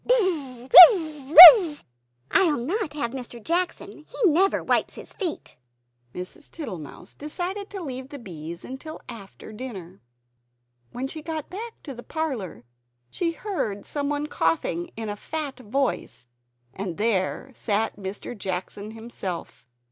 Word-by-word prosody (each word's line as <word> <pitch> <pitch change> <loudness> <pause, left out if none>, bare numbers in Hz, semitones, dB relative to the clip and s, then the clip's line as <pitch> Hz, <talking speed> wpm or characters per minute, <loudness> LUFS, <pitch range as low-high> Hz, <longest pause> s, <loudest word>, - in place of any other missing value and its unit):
"Bizz, 310 - -1 0.3
Wizz, 305 -5 -8
Wizzz!" 340 -1 +10 0.5
"I 360 -4 +3
will 240 -5 -3
not 365 - -3
have 260 -6 -3
Mr. 245 -2 -8
Jackson; 345 +9 -3
he 430 -7 +1
never 380 +6 +1
wipes - - 0
his - - -11
feet." 360 -6 -5 0.6
Mrs. 180 - -9
Tittlemouse 190 - -9
decided 370 +7 -6
to 390 -3 -7
leave 260 -2 -7
the 285 - -8
bees 170 - -9
till 315 +1 -10
after 220 -2 -11
dinner. 195 -7 -9 0.9
When 255 +2 -5
she 310 +3 -8
got 315 -1 -6
back 450 +5 -7
to 280 - -8
the 240 - -10
parlor, 245 - -5 0.5
she 345 - -2
heard 315 - -4
some 285 -1 -4
one 290 0 -2
coughing 165 - -2
in 225 -1 -5
a 205 - -4
fat 290 +4 -6
voice; 255 - -3 0.5
and 185 -4 -6
there 215 +4 -1
sat 220 -1 -2
Mr. 200 +4 -7
Jackson 195 +1 -6
himself. 190 - -8
265 Hz, 140 wpm, -24 LUFS, 205-320 Hz, 0.9 s, Wizzz